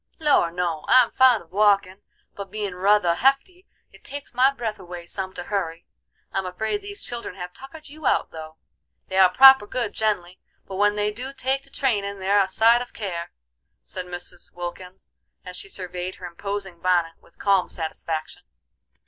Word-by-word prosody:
"Lor', 295 - +3
no, 170 -2 -2
I'm 255 - +6
fond 255 -6 +5
of 165 - -27
walkin', 200 -1 +2 0.3
but 200 -1 -8
bein' 205 -3 -4
ruther 185 -1 +3
hefty 275 - +1 0.2
it - - -19
takes 285 -1 -8
my 255 +3 +4
breath 225 -6 -4
away 175 -2 -9
some 190 +2 -4
to - - -5
hurry. 175 -4 -3 0.5
I'm 195 -1 -1
afraid 220 - -2
these 405 0 -7
children 235 -6 -6
have 180 -1 -7
tuckered 300 +4 -12
you 300 -1 -5
out - - +1
though. 160 0 -9 0.5
They 190 - 0
are 185 -1 +8
proper 265 +1 +8
good 235 -1 -3
gen'lly, 190 -5 -1 0.3
but 190 - -7
when 205 +1 +3
they 210 0 0
do 255 +5 -7
take 270 0 -1
to - - -16
trainen 205 -8 -1
they're 195 +2 +3
a 195 - +1
sight 230 +5 +4
of 245 - -8
care," 175 -6 -5 0.5
said 180 - -7
Mrs. 175 0 -8
Wilkins, 180 +1 -8 0.3
as 180 - -8
she 195 - -8
surveyed 180 -1 -5
her 180 - -10
imposing 190 0 -5
bonnet 175 -2 +1
with - - -25
calm 195 -2 +2
satisfaction. 160 -1 -4
195 Hz, 175 wpm, -24 LUFS, 180-240 Hz, 0.5 s, are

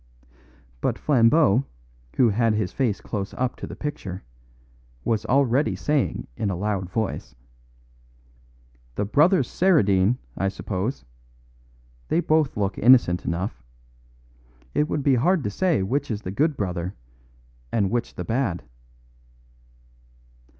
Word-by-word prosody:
But - - 0
Flambeau, 130 -2 +4 0.5
who 120 - +5
had 110 +1 +2
his 105 -4 -1
face 120 -7 0
close 100 -1 -5
up 125 -1 -1
to - - -6
the - - -8
picture, 100 - -5 0.8
was 110 +3 -1
already 135 +1 +2
saying 150 -3 -1
in 100 - -2
a 95 - -1
loud 95 -1 -2
voice, 110 - -3 1.6
"The 105 - -1
brothers 150 - +3
Saradine, 105 - +3 0.2
I 95 - 0
suppose. 105 +6 -4 1.0
They - - +1
both 155 -6 +1
look 100 -1 -1
innocent 120 -7 +5
enough. 90 +5 -3 1.1
It 150 +2 +1
would 145 - -1
be 140 - +4
hard 160 +6 +2
to 105 - -2
say 165 - +1
which 140 +8 -1
is 110 -2 -3
the 95 - -4
good 150 +8 +1
brother 90 -2 -3 0.8
and 100 -4 +1
which 120 0 -2
the - - -5
bad." 115 -7 -1
115 Hz, 125 wpm, -24 LUFS, 100-140 Hz, 1.6 s, who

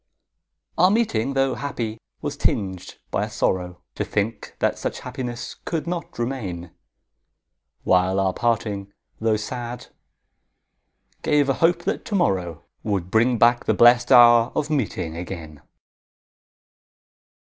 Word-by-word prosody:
Our 180 +2 +6
meeting, 140 - 0
tho' 135 -1 +2
happy, 115 -6 -4 0.2
was - - -3
tinged 95 -3 -2
by - - 0
a - - -8
sorrow 90 -1 -2
To - - -2
think 110 +2 -3
that - - 0
such - - -4
happiness 120 -2 -6
could 160 -3 -3
not 170 -2 -5
remain; 100 -9 -4 1.1
While 95 +1 +3
our 95 -1 +1
parting, 105 -4 -1 0.3
tho' 110 -1 +1
sad, 120 +2 -6 1.3
gave 145 -2 +2
a - - +4
hope 170 +1 +3
that - - -2
to 210 - -3
morrow 90 - 0 0.2
Would 95 -4 -2
bring 120 +2 +3
back 120 +2 +4
the - - +2
blest 120 +1 +5
hour 120 -1 +7
of 155 +1 -1
meeting 95 - -2
again. 85 -4 -7
115 Hz, 125 wpm, -23 LUFS, 95-130 Hz, 1.3 s, hour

